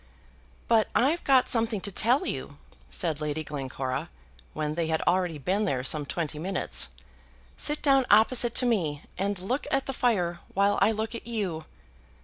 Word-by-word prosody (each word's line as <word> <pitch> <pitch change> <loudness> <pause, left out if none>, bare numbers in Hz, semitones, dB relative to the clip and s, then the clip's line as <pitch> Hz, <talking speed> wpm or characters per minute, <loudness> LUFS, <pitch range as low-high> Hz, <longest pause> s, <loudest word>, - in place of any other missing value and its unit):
"But 225 -2 +3
I've 300 +8 +2
got 265 -2 +4
something 225 -2 +1
to 200 - -3
tell 245 - +2
you," - - -5 0.3
said 160 -3 -1
Lady 150 +1 -2
Glencora, 135 -3 -4 0.4
when 150 -1 -2
they 165 0 -1
had 160 0 0
already 175 -3 +1
been 190 +9 0
there 130 -9 -1
some 145 +1 0
twenty 155 -2 -3
minutes. 190 +4 0 0.7
"Sit 295 0 0
down 270 -3 +4
opposite 235 +1 +4
to 255 - +4
me, 165 -12 0 0.2
and 200 +1 -1
look 220 +10 -3
at 275 0 0
the 270 - -3
fire 180 -9 0 0.2
while 200 +1 +2
I 220 - +5
look 220 +1 -3
at 230 - -7
you." 190 -9 -3
195 Hz, 165 wpm, -27 LUFS, 160-235 Hz, 0.7 s, I